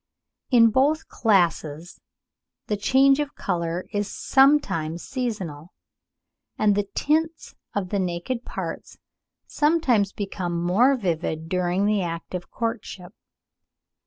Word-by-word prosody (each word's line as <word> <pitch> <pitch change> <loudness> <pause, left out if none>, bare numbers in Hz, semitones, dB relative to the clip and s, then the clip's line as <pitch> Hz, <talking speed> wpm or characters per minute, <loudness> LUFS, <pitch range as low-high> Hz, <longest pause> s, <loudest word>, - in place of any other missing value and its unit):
In 230 -3 +6
both 290 +7 +2
classes 170 -6 0 0.6
the 210 - -1
change 270 +6 +4
of 295 -1 -3
colour 170 -1 -2
is 205 0 -1
sometimes 265 - +2
seasonal, 190 - -5 0.8
and 210 -1 +3
the 205 0 -1
tints 320 +2 0 0.2
of 195 -3 -2
the 200 - -1
naked 185 +7 -3
parts - - -6 0.5
sometimes 285 -10 +2
become 185 -4 -4
more 220 +11 +3
vivid 160 -5 -2
during 180 +2 0
the 210 -1 +2
act 170 -1 -5
of 180 -1 -5
courtship. 225 -5 -5
200 Hz, 110 wpm, -24 LUFS, 175-255 Hz, 0.8 s, In